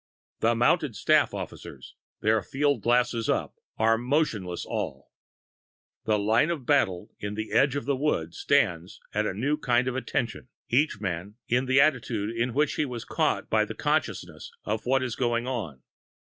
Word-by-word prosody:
The 115 +1 +2
mounted 120 +2 +2
staff - - +3
officers, - - -8 0.3
their 110 0 +3
field 145 -2 0
glasses 120 -1 +1
up, - - 0 0.2
are 115 0 +3
motionless 120 - -1
all. - - -4 0.9
The 110 -1 +2
line 110 +9 +2
of 155 -7 -3
battle 115 -12 +1
in 105 0 -4
the 110 +1 -5
edge 140 0 +3
of 140 - -3
the 140 0 +1
wood 105 - -1
stands 95 -12 +1
at 105 0 +1
a - - -3
new 140 +8 0
kind 125 -3 +1
of 130 - -1
"attention," 125 -2 -3 0.2
each 135 -2 +2
man 95 0 -4
in 125 +2 +1
the 130 +1 +4
attitude 115 -7 +1
in 120 +1 -1
which 150 0 +1
he 155 - +1
was 125 -4 -6
caught - - 0
by - - +3
the - - -6
consciousness - - -2
of 110 +2 -3
what 135 0 +3
is 125 -3 -3
going 120 -1 0
on. 100 - -4
120 Hz, 170 wpm, -27 LUFS, 105-135 Hz, 0.9 s, the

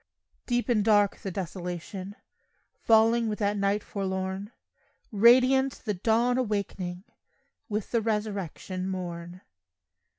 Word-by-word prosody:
Deep 245 -1 0
and 225 -4 +2
dark 205 -2 +3
the 195 - -6
desolation 185 +1 -6 0.6
Falling 225 +1 +3
with 210 - -2
that 205 -1 0
night 200 +1 0
forlorn; 190 +1 -4 0.6
Radiant 255 +5 +5
the 210 - 0
dawn 230 +6 +2
awakening 195 -5 -3 0.7
With 210 -1 -3
the 230 - +2
resurrection 200 -4 -3
morn. 175 -1 -6
205 Hz, 105 wpm, -27 LUFS, 190-225 Hz, 0.7 s, Radiant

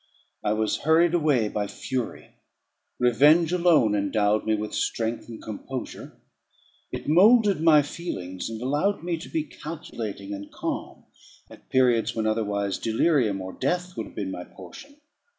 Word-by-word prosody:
I 105 - +1
was 110 0 0
hurried 165 +2 +3
away 150 -10 +2
by 105 -1 -2
fury; 125 +2 -5 0.6
revenge 150 +7 +4
alone 170 -11 +4
endowed 105 +1 +1
me 110 - +3
with 105 0 -4
strength 115 +1 -2
and 115 - -8
composure; 125 +4 -7 0.7
it - - -6
moulded 200 +3 +5
my 155 -3 +6
feelings, 95 - -5
and 110 -1 -6
allowed 150 +8 0
me 170 -1 -1
to 160 - -10
be 320 -2 -1
calculating 115 - -7
and 100 0 -8
calm, - - -5 0.5
at - - -16
periods 125 -3 +2
when 110 -1 -1
otherwise 105 -3 -1
delirium 115 - +1
or 95 0 -7
death 180 0 -2
would 110 - -4
have - - -16
been 95 -2 -3
my 90 - -6
portion. 100 - -13
120 Hz, 150 wpm, -25 LUFS, 105-165 Hz, 0.7 s, my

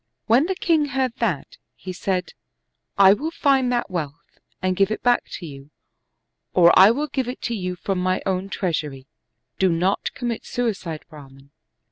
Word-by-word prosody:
When 245 +8 +4
the 380 - -1
king 325 -4 +2
heard 265 -3 -1
that, 195 - -2 0.2
he 185 - -8
said, 180 0 -2 0.3
" - - -53
I 195 - +8
will 300 +10 -3
find 275 -6 +2
that 240 -5 -1
wealth 165 -2 -6 0.2
and 185 0 0
give 195 +1 +2
it 215 - -4
back 245 0 +3
to 175 - -6
you, 140 -2 -11 0.9
or 175 -1 +7
I 190 +2 +8
will 280 +7 0
give 265 -3 -3
it 250 - -4
you 185 -5 -3
from 190 +1 -3
my 185 0 0
own 190 0 -1
treasury, 150 -9 -3 0.5
do 190 - +4
not 180 +4 0
commit 240 -3 -3
suicide. 195 -10 -3
Brahman." 140 -3 -15
190 Hz, 170 wpm, -22 LUFS, 170-245 Hz, 0.9 s, I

